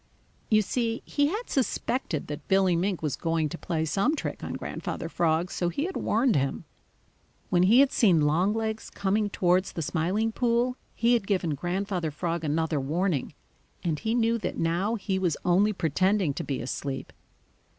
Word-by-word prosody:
You 215 -1 +4
see, 230 +2 -1
he 285 0 +1
had 425 +10 -3
suspected 250 - -1
that 145 -1 -7
Billy 190 -2 +3
Mink 180 0 -1
was 145 -4 0
going 165 -1 0
to 170 - -6
play 160 -3 -1
some 200 - +1
trick - - -5
on - - -4
Grandfather - - -4
Frog, 165 +1 0
so 175 - -1
he 225 - -2
had 375 +2 -3
warned 230 +1 +2
him. 135 -1 -1 0.9
When 175 - +4
he 220 +8 +6
had 280 - +4
seen 185 - +4
Longlegs 210 +9 0
coming 205 +2 0
towards 180 -1 +1
the 165 - -3
Smiling 185 +9 0
Pool, 240 +2 +1 0.2
he 235 +1 +3
had 230 -5 +1
given 185 -6 +1
Grandfather 180 +2 -2
Frog 165 +2 -3
another 155 0 0
warning, 155 +2 -1 0.5
and 160 -4 -1
he 225 +1 -1
knew 230 -1 +2
that 205 - -4
now 175 +7 0
he 195 -3 -2
was 180 -5 0
only 190 +4 +4
pretending 185 -1 +1
to - - -4
be 135 - -3
asleep. 135 +2 -4
185 Hz, 170 wpm, -27 LUFS, 165-220 Hz, 0.9 s, he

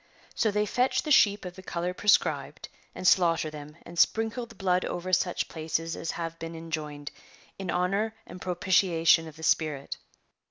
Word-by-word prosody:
So 220 - +1
they 210 0 +1
fetch 250 +5 +1
the 305 - -3
sheep 205 -7 +5
of 180 0 -7
the 190 - -10
colour 180 -1 -3
prescribed, 205 +2 +1 0.3
and 185 - -1
slaughter 165 -4 +3
them, 150 +1 -10
and 170 0 -7
sprinkle 225 +2 +2
the 230 - -15
blood 185 -2 +1
over 185 +1 -4
such 180 0 +1
places 165 +1 -3
as 165 - -5
have 165 -1 -4
been 165 0 -6
enjoined, 150 -3 -5 0.5
in 190 -2 -5
honour 195 +6 0
and 180 - -11
propitiation 175 -3 +3
of 155 - -11
the 160 - -12
spirit. 155 -4 0
175 Hz, 170 wpm, -28 LUFS, 165-195 Hz, 0.5 s, sheep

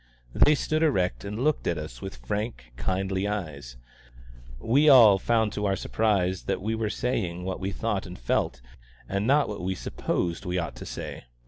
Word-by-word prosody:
They 150 - +5
stood 155 +2 -1
erect 90 - +1
and 105 +5 -4
looked 155 0 +1
at 85 - 0
us 75 -6 -7
with - - -6
frank, 105 - -4
kindly 95 +9 -1
eyes; 75 -12 -5 0.8
we 140 - +4
all 110 -8 +8
found 110 -1 +1
to 105 0 -1
our 95 - +1
surprise 95 -4 0
that - - -1
we 110 +4 -2
were 110 -1 -1
saying 95 -8 -2
what 95 0 -3
we 95 - -2
thought 105 -2 -2
and 90 - -9
felt, - - -1 0.5
and 100 +2 -1
not 145 +2 +4
what 105 -2 -5
we 95 +1 -2
supposed 85 -1 -2
we 90 -1 -2
ought 85 -8 -3
to - - -8
say. - - -7
95 Hz, 185 wpm, -27 LUFS, 90-110 Hz, 0.8 s, all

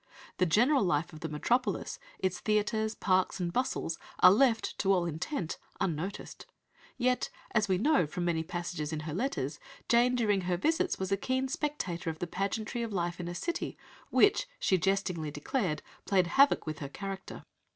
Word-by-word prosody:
(The 185 - +4
general 245 - +4
life 170 -1 0
of 155 - -9
the 160 -1 -4
metropolis, 240 - 0 0.2
its 185 -1 -1
theatres, 215 +1 0
parks, 185 -1 +1
and 175 -1 -2
bustle 255 -9 0 0.3
are 180 - +10
left, 225 +2 +3
to 195 - +3
all 180 -3 +3
intent, 170 - -3 0.2
unnoticed. 175 +3 -3 0.5
Yet, 250 0 +1 0.2
as 215 -1 +2
we 190 -2 +2
know 275 - +3
from 175 +4 -3
many 165 -2 +1
passages 170 -2 -4
in 155 -1 -3
her 155 -1 -5
letters, 165 - -2 0.3
Jane 240 +1 +4
during 210 -5 +2
her 180 -1 0
visits 325 - +1
was 190 0 -3
a 195 - +3
keen 260 +5 0
spectator 255 - -2
of 160 - -4
the 175 - -3
pageantry 200 +6 -2
of 230 -1 -3
life 175 -2 -2
in 175 - -4
a 175 - -4
city 345 - -3 0.3
which, - - +4
she 190 - +2
jestingly 180 -4 0
declared, 155 - -2 0.2
played 190 -3 +3
havoc 275 +11 +4
with 155 -1 -4
her 140 - -5
character. 195 +4 -7
190 Hz, 175 wpm, -31 LUFS, 170-230 Hz, 0.5 s, are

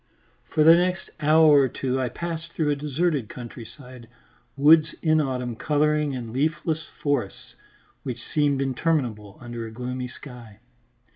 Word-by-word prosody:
For 155 - +1
the 165 +2 +8
next 180 +2 -1
hour 155 -1 +6
or 135 - +3
two 130 +2 -2
I 125 - -1
passed 165 +1 -6
through 150 -2 0
a - - +1
deserted 145 -3 -1
countryside, 125 0 -11 0.5
woods 155 +2 +5
in 155 -1 +3
autumn 125 -4 -3
colouring 150 +1 +1
and 115 -3 -6
leafless 155 +3 -1 0.2
forests 140 -9 -2 0.5
which 120 -2 -6
seemed 145 -2 +2
interminable 125 -7 -2
under 120 -2 -7
a - - -10
gloomy 125 +2 -5
sky. 125 -5 -12
140 Hz, 140 wpm, -24 LUFS, 125-155 Hz, 0.5 s, the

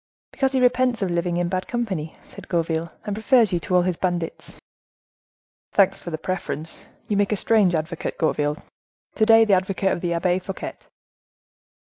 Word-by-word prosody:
"Because 270 -1 0
he 265 - +2
repents 250 -2 +2
of 185 - -1
living 170 0 0
in 175 0 0
bad 185 +1 -2
company," 195 -10 -3
said - - -13
Gourville, 165 -1 -1
"and 205 - -2
prefers 220 -1 +3
you 175 - +2
to 180 +3 -2
all 180 - +5
his 180 -2 -1
bandits." 175 -3 -3 1.2
"Thanks 195 -2 +3
for - - -7
the 160 - -3
preference! 165 -2 -5 0.2
You 210 - 0
make 200 +1 +1
a - - +2
strange 200 -5 +3
advocate, 160 +1 -3
Gourville, 150 -2 0 0.6
to 220 - +2
day—the 225 -2 +6
advocate 190 +1 +1
of - - -2
the 170 -1 -1
Abbe 175 +2 +1
Fouquet!" 190 +1 -6
185 Hz, 175 wpm, -23 LUFS, 170-210 Hz, 1.2 s, day—the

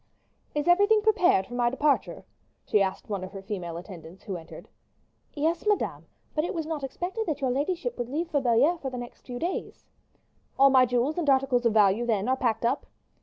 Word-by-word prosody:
"Is 295 +2 -1
everything 405 +4 +4
prepared 365 - +3
for 245 - -12
my 240 -1 +2
departure?" 280 +3 0 0.4
she 210 - +2
inquired 190 -1 -1
of - - -28
one 195 -2 -2
of 185 +2 -8
her 195 - -7
female 180 -5 -5
attendants 175 -1 -11
who 195 - -5
entered. 165 -2 -10 0.7
"Yes, 320 +7 -1
madame; 415 -1 0 0.3
but 305 - 0
it 350 - -3
was 325 -2 -2
not 310 -3 -4
expected 360 - -4
that 300 -3 -2
your 265 -3 0
ladyship 340 - -2
would 240 0 -3
leave 325 +5 -2
for 290 -4 +1
Belliere 265 +8 +3
for 270 - -4
the 255 - -6
next 245 0 -9
few 245 -1 -5
days." 345 +8 -4 0.7
"All 275 0 +6
my 255 -1 +6
jewels 245 +7 0
and 310 -4 0
articles 265 -3 +3
of 225 - 0
value, 215 +2 +3
then, 215 -2 0
are 260 - +3
packed 230 -3 -1
up?" 255 +4 0
260 Hz, 210 wpm, -27 LUFS, 225-320 Hz, 0.7 s, All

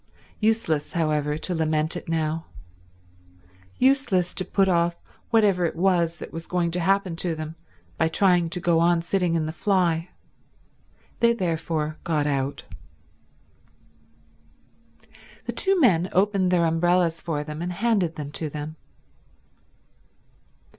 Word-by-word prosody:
Useless, 215 -9 0
however, 150 -3 0
to 180 +3 -4
lament 155 0 0
it 175 - -7
now. 160 0 -1 1.3
Useless 250 -10 +2
to 185 - -2
put 195 +1 +1
off 170 -1 +2 0.3
whatever 205 -6 +3
it 165 - -1
was 170 -2 +1
that - - -9
was 165 0 -6
going 175 -2 0
to 175 - -2
happen 190 0 +1
to 170 -1 -1
them 155 0 -6 0.5
by 160 - +3
trying 175 0 +3
to 180 +1 -4
go 170 -1 +2
on 170 0 +3
sitting 175 -1 0
in 160 -2 0
the 155 - -3
fly. 170 -1 0 1.1
They 235 0 +4
therefore 160 -5 -2
got 155 -3 0
out. 140 -1 -2 2.8
The - - -2
two 390 -1 +2
men 185 - +3
opened 195 -1 +2
their 175 -2 +3
umbrellas 170 +1 +2
for 155 -3 -2
them 150 +1 -7
and 175 +1 -3
handed 195 -4 0
them 145 -1 -6
to 155 +1 -4
them. 150 +2 -6
170 Hz, 135 wpm, -24 LUFS, 160-185 Hz, 2.8 s, They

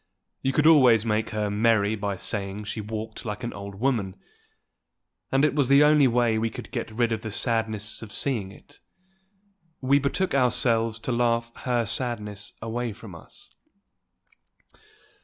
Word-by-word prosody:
You 135 - 0
could 150 +3 +1
always 125 -9 +6
make 110 0 0
her 105 -1 -2
merry 110 0 +2
by 100 -1 -3
saying 100 +1 -3
she 105 +1 -5
walked 110 +1 -6
like 105 0 -5
an 120 - -4
old 100 0 -8
woman; 105 -5 -1 1.2
and 135 +2 +3
it 150 - +1
was 140 -3 +1
the 140 +1 +7
only 150 -2 +5
way 120 -2 +2
we 115 +1 0
could - - -9
get - - -4
rid 115 +1 0
of 110 -1 -2
the 110 - -5
sadness 110 -1 -1
of 110 -2 -9
seeing 110 -9 -1
it. 145 +7 -17 1.0
We 140 +2 +3
betook 145 +7 -1
ourselves 120 -3 +2
to 125 - -3
her 120 - 0
to 120 - +2
laugh 115 0 0
her 120 -2 -1
sadness 105 -3 -4
away 115 0 -3
from 110 -3 -12
us. 85 - -13
115 Hz, 165 wpm, -25 LUFS, 105-125 Hz, 1.2 s, the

